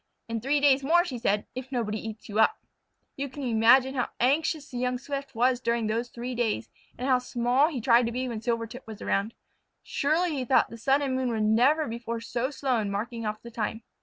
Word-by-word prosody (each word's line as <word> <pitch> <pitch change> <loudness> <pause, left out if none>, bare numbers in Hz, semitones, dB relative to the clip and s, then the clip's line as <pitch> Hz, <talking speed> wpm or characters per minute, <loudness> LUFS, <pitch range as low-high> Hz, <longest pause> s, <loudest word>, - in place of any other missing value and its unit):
In 230 -1 -3
three 280 +4 +2
days 280 -1 +4
more," 345 +5 +4
she 255 -8 -5
said, 205 -2 +1
"if 260 +1 -7
nobody 220 -4 -1
eats 220 0 -8
you 210 +1 -2
up." 430 - +4 0.6
You 280 0 -3
can 280 +2 -7
imagine 245 +3 +4
how 250 -3 -1
anxious 290 +3 +1
the 245 - -4
young 250 0 0
Swift 275 0 -6
was 245 +2 +2
during 235 -2 0
those 230 +3 -1
three 245 +2 -5
days, 225 - -1 0.3
and 250 - -3
how 255 -2 +4
small 250 +3 +2
he 300 -6 -3
tried 235 0 +4
to - - -2
be 255 +2 -2
when 230 -3 -4
Silvertip 230 +1 -3
was 220 -2 -8
around. 200 +3 -1 0.5
"Surely," 325 +5 +1
he 270 -3 -2
thought, 255 +1 +3
"the 230 - -8
sun 275 +4 +2
and 270 -2 -1
moon 260 -1 0
were 225 -2 -1
never 245 +9 +3
before 235 0 -4
so 240 +2 -2
slow 270 -4 0
in 210 -2 -2
marking 225 +3 -3
off 215 0 -4
the 235 - -9
time." 225 0 -3
245 Hz, 220 wpm, -27 LUFS, 230-270 Hz, 0.6 s, days